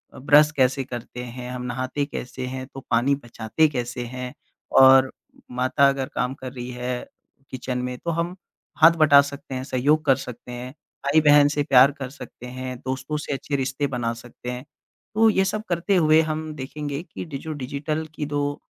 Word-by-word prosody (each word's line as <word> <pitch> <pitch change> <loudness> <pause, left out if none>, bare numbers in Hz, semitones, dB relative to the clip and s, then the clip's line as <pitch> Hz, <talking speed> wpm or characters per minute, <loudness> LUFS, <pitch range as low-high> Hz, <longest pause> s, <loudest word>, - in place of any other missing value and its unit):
Brush 150 +3 +5
कैसे 130 0 +2
करते 125 -1 -7
हैं? 125 +1 -7
हम 125 0 -5
नहाते 130 +3 -2
कैसे 125 -2 -6
हैं? 130 0 -5
तो 135 - -10
पानी 125 +5 +3
बचाते 115 +6 +1
कैसे 125 -2 -4
हैं? 125 +1 -6 0.4
और 130 0 +7 0.4
माता 130 +3 +3
अगर 135 -1 -1
काम 125 +1 0
कर 130 -2 -8
रही 125 -1 -6
है 125 0 -4 0.4
किचन 125 -1 -4
में 125 0 -3
तो 170 - -3
हम 170 +2 -2 0.5
हाथ 165 +1 +9
बटा 145 -2 +8
सकते 140 -1 -7
हैं, 130 - -3
सहयोग 140 +4 +1
कर 135 -2 +5
सकते 125 -2 -9
हैं, 125 +1 -6 0.3
भाई-बहन 145 0 +6
से 145 0 0
प्यार 135 0 +6
कर 130 -2 -4
सकते 125 -3 -11
हैं, 130 0 -6
दोस्तों 130 +3 -3
से - - -2
अच्छे 140 +1 -3
रिश्ते 135 +1 -1
बना 120 -3 -2
सकते 120 +1 -8
हैं। 125 +2 -7 0.5
तो 225 +1 +5
ये 195 -2 +2
सब 215 +3 -2
करते 175 +3 +1
हुए 160 -2 +5
हम 155 0 -3
देखेंगे 145 +1 -5
कि - - -8
डि 145 -5 -6
जो 155 +3 -6
डिजिटल 145 +3 -3
की 150 - -3
जो 145 0 -2
135 Hz, 185 wpm, -24 LUFS, 125-150 Hz, 0.5 s, हाथ